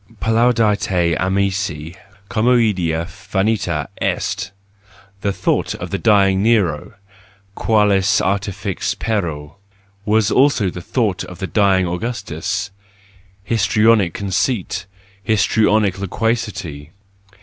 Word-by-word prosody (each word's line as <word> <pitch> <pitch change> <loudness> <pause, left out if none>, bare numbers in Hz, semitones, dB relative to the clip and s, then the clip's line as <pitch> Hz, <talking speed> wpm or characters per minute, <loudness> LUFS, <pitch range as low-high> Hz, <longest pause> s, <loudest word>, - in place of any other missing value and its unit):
Plaudite 115 -2 +2 0.3
amici, 95 -4 -1 0.3
comoedia 105 -9 +1
jinita 95 -5 -2 0.2
est 100 0 -1 0.4
!— 100 -1 -27
The 100 - 0
thought - - -1
of - - -7
the - - -2
dying 100 -3 +3
Nero: 100 -9 +1 0.6
qualis 105 -3 +2
artifexpereo! 95 -4 -2 0.5
was 105 0 +2
also 130 -8 +3
the 90 - -7
thought 100 0 -1
of 90 - -10
the 95 - -4
dying 95 -2 +2
Augustus: 90 -2 -3 0.7
histrionic 105 -3 +2
conceit! 95 -1 -2 0.4
histrionic 105 -1 +2
loquacity! 100 -7 -3
100 Hz, 90 wpm, -19 LUFS, 95-110 Hz, 0.7 s, dying